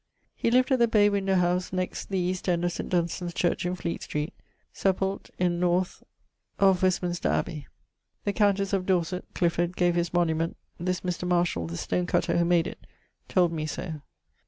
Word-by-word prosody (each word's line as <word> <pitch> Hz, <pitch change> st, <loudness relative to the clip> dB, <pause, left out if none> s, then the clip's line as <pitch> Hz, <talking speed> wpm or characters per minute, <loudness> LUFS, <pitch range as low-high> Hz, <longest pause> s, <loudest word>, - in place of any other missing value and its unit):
He -, -, 0 dB
lived 255 Hz, +3 st, +3 dB
at 260 Hz, -, +4 dB
the 235 Hz, -, +5 dB
bay 210 Hz, -2 st, +4 dB
windowe 195 Hz, -1 st, +1 dB
house 180 Hz, 0 st, +1 dB
next 185 Hz, -1 st, -3 dB
the 195 Hz, -, -1 dB
east 180 Hz, +1 st, -1 dB
end 175 Hz, 0 st, +1 dB
of 175 Hz, -, +1 dB
St. -, -, -5 dB
Dunstan's 175 Hz, 0 st, -1 dB
Church 175 Hz, 0 st, +1 dB
in 180 Hz, -, -1 dB
Fleet 170 Hz, -2 st, -4 dB
street. 150 Hz, +2 st, -3 dB, 0.4 s
Sepult. 195 Hz, 0 st, -1 dB
in 175 Hz, -1 st, +1 dB
north 180 Hz, +1 st, +1 dB, 0.3 s
+ -, -, -45 dB
of 190 Hz, -2 st, +3 dB
Westminster 180 Hz, -2 st, +1 dB
Abbey. 150 Hz, -5 st, -2 dB, 0.6 s
The 205 Hz, -, 0 dB
countesse 200 Hz, -2 st, +2 dB
of 185 Hz, -2 st, 0 dB
Dorset 180 Hz, -1 st, 0 dB
(Clifford) 175 Hz, 0 st, 0 dB
gave 175 Hz, -1 st, +3 dB
his 170 Hz, -1 st, 0 dB
monument: 165 Hz, -1 st, +1 dB, 0.2 s
this 180 Hz, +1 st, -1 dB
Mr. 180 Hz, -1 st, -3 dB
Marshall 175 Hz, -, +1 dB
(the 85 Hz, +1 st, -5 dB
stone 180 Hz, -, -1 dB
cutter), 175 Hz, -, +1 dB
who 170 Hz, -, +3 dB
made 170 Hz, -1 st, +3 dB
it, -, -, -6 dB, 0.5 s
told 180 Hz, -3 st, +3 dB
me 155 Hz, -1 st, -2 dB
so. 155 Hz, 0 st, -5 dB
180 Hz, 185 wpm, -27 LUFS, 170-185 Hz, 0.6 s, the